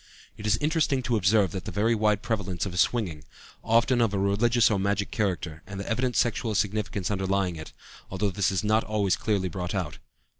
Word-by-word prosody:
It 105 Hz, -, -6 dB
is 105 Hz, +1 st, +3 dB
interesting 150 Hz, -1 st, +1 dB
to 120 Hz, -1 st, 0 dB
observe 100 Hz, -2 st, +3 dB
the 95 Hz, -, -5 dB
very 110 Hz, +3 st, +1 dB
wide 105 Hz, -2 st, +1 dB
prevalence 100 Hz, -6 st, -2 dB
of 90 Hz, -2 st, -4 dB
swinging, 90 Hz, -9 st, 0 dB, 0.4 s
often 115 Hz, +2 st, +3 dB
of 110 Hz, -3 st, +1 dB
a -, -, +1 dB
religious 110 Hz, +4 st, +3 dB
or 100 Hz, -, +1 dB
magic 100 Hz, +1 st, -1 dB
character, 90 Hz, -6 st, -2 dB
and 100 Hz, -1 st, -7 dB
the 100 Hz, -, -5 dB
evident 125 Hz, +2 st, 0 dB
sexual 115 Hz, -2 st, 0 dB
significance 105 Hz, -1 st, -1 dB
underlying 95 Hz, -2 st, 0 dB
it, 80 Hz, -1 st, -9 dB, 0.4 s
although 95 Hz, +2 st, -1 dB
this 95 Hz, 0 st, +1 dB
is 95 Hz, -3 st, -1 dB
not 110 Hz, +1 st, +2 dB
always 105 Hz, -3 st, +1 dB
clearly 100 Hz, -4 st, -1 dB
brought 90 Hz, +2 st, -4 dB
out. 85 Hz, -6 st, -3 dB
100 Hz, 190 wpm, -27 LUFS, 95-110 Hz, 0.4 s, is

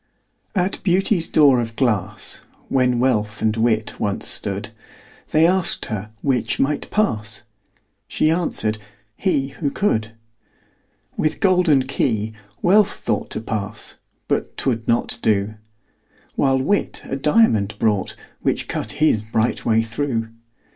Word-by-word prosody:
At 185 Hz, 0 st, 0 dB
Beauty's 185 Hz, -1 st, +2 dB
door 140 Hz, -5 st, +5 dB
of 115 Hz, -1 st, -3 dB
glass, 105 Hz, -5 st, -1 dB, 0.3 s
When 125 Hz, -2 st, +2 dB
Wealth 110 Hz, -4 st, +1 dB
and 110 Hz, -1 st, +1 dB
Wit 110 Hz, -1 st, 0 dB
once 100 Hz, -1 st, -1 dB
stood, -, -, -1 dB, 0.6 s
They 155 Hz, +1 st, +4 dB
asked 185 Hz, 0 st, +1 dB
her 105 Hz, -2 st, -5 dB
'which 130 Hz, -4 st, 0 dB
might 145 Hz, +2 st, 0 dB
pass?" 110 Hz, -, -1 dB, 0.6 s
She 155 Hz, -, +2 dB
answered, 110 Hz, -11 st, 0 dB, 0.4 s
"he, 140 Hz, -8 st, 0 dB
who 145 Hz, +1 st, -3 dB
could." 110 Hz, -, 0 dB, 1.0 s
With 155 Hz, -, 0 dB
golden 180 Hz, -8 st, +4 dB
key 110 Hz, -5 st, -1 dB, 0.3 s
Wealth 200 Hz, +3 st, +5 dB
thought -, -, -2 dB
To -, -, -3 dB
pass 105 Hz, -1 st, -5 dB, 0.3 s
but -, -, -2 dB
'twould 115 Hz, -4 st, -1 dB
not 115 Hz, 0 st, 0 dB
do: 105 Hz, 0 st, +1 dB, 0.8 s
While 135 Hz, -1 st, +3 dB
Wit 170 Hz, +10 st, 0 dB
a -, -, -4 dB
diamond 135 Hz, -, +3 dB
brought, 105 Hz, -3 st, 0 dB, 0.3 s
Which -, -, 0 dB
cut -, -, -2 dB
his 150 Hz, -8 st, +2 dB
bright 110 Hz, +1 st, -1 dB
way 115 Hz, 0 st, +3 dB
through. 115 Hz, -1 st, -2 dB
120 Hz, 125 wpm, -21 LUFS, 110-155 Hz, 1.0 s, door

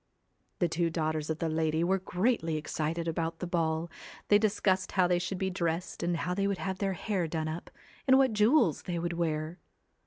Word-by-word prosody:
The 175 Hz, -, +2 dB
two 165 Hz, +1 st, 0 dB
daughters 155 Hz, -2 st, -2 dB
of 160 Hz, -, -1 dB
the 165 Hz, -, -1 dB
lady 160 Hz, 0 st, +1 dB
were 190 Hz, +2 st, +2 dB
greatly 180 Hz, -3 st, 0 dB
excited 160 Hz, +2 st, -2 dB
about 165 Hz, 0 st, -2 dB
the 180 Hz, -, -4 dB
ball; 165 Hz, -1 st, -1 dB, 0.4 s
they 205 Hz, -, +7 dB
discussed 195 Hz, -3 st, +1 dB
how 185 Hz, -2 st, +4 dB
they 175 Hz, 0 st, +2 dB
should 180 Hz, +2 st, -3 dB
be 190 Hz, 0 st, -1 dB
dressed 170 Hz, -1 st, -2 dB
and 175 Hz, 0 st, 0 dB
how 180 Hz, +2 st, -2 dB
they 200 Hz, +1 st, 0 dB
would 200 Hz, -1 st, 0 dB
have 190 Hz, 0 st, -3 dB
their 195 Hz, -1 st, 0 dB
hair 185 Hz, -2 st, -1 dB
done 160 Hz, 0 st, -2 dB
up, 160 Hz, +2 st, -5 dB, 0.4 s
and 260 Hz, 0 st, +7 dB
what 265 Hz, -4 st, +4 dB
jewels 215 Hz, -, +4 dB
they 175 Hz, -1 st, -3 dB
would 170 Hz, +1 st, -2 dB
wear. 160 Hz, 0 st, -2 dB
175 Hz, 205 wpm, -30 LUFS, 160-190 Hz, 0.4 s, they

